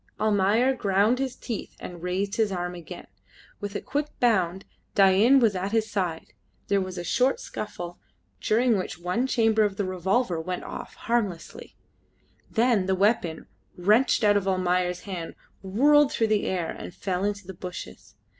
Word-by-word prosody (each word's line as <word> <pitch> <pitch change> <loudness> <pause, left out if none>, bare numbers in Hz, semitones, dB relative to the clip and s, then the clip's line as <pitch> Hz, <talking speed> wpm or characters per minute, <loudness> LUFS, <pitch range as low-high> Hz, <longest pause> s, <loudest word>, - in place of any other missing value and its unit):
Almayer 215 +4 +3
ground 205 +1 +2
his 265 -2 -2
teeth 225 -4 -6
and 175 -2 -8
raised 190 +4 -2
his 220 -3 +2
arm 180 -1 -3
again. 175 -2 -9 0.5
With 205 0 -6
a - - -2
quick 290 +1 -2
bound 190 -6 +1 0.3
Dain 200 +7 +6
was 225 -5 +3
at 190 +3 -3
his 220 -1 +1
side: 180 -6 -3 0.4
there 200 -1 +3
was 185 -1 -5
a 175 - -4
short 255 +8 +1
scuffle, 175 -5 -7 0.4
during 230 -1 +2
which 185 - -5
one 180 +9 -1
chamber 225 -3 +2
of 205 -2 +1
the 205 - 0
revolver 185 0 0
went 180 +2 -4
off - - -8
harmlessly, 210 -8 -3 0.7
then 225 -5 +2
the 190 - +2
weapon, 185 -5 +1 0.3
wrenched 215 +8 +3
out 205 -1 +5
of 195 -1 -2
Almayer's 180 -1 0
hand, 180 -5 -6 0.3
whirled 280 +9 +4
through 225 -1 +1
the 210 - +1
air 180 -3 -1
and 175 - -9
fell 185 -1 -2
in 205 0 +1
the 190 - -8
bushes. 180 0 -9
200 Hz, 165 wpm, -26 LUFS, 180-225 Hz, 0.7 s, Dain